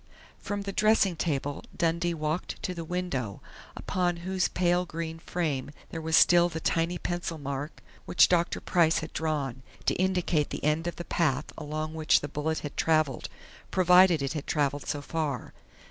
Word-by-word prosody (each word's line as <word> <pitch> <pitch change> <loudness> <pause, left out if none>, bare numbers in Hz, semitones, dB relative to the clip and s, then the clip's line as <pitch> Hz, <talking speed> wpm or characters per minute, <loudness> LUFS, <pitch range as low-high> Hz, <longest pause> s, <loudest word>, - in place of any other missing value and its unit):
From 205 -1 -4
the 200 - -4
dressing 215 -4 +3
table 145 -3 -2
Dundee 170 0 +1
walked 155 +3 -3
to 180 - -2
the 170 -2 -5
window, 160 - -3 0.4
upon 175 -1 -1
whose 190 0 +1
pale 175 0 +1
green 165 -1 -5
frame 155 -6 -2 0.2
there 165 - -4
was 160 0 +1
still 175 0 +6
the 160 -1 -4
tiny 165 +2 0
pencil 175 -1 -3
mark 140 +1 -5 0.2
which - - +5
Dr. 175 -1 +1
Price 170 -3 +3
had - - -13
drawn, 145 -5 -2 0.2
to - - +3
indicate 180 -5 +1
the - - -6
end 155 +3 +1
of 175 - -3
the 175 - -7
path 150 -4 +1
along 155 +1 -4
which 155 -1 +3
the 145 - -4
bullet 150 +2 -2
had 145 - -6
traveled, 155 -5 +1 0.4
provided 180 -3 +5
it 135 +1 -2
had 150 -2 -5
traveled 145 -1 0
so 145 -1 -2
far. 150 -4 -3
160 Hz, 170 wpm, -28 LUFS, 150-175 Hz, 0.4 s, still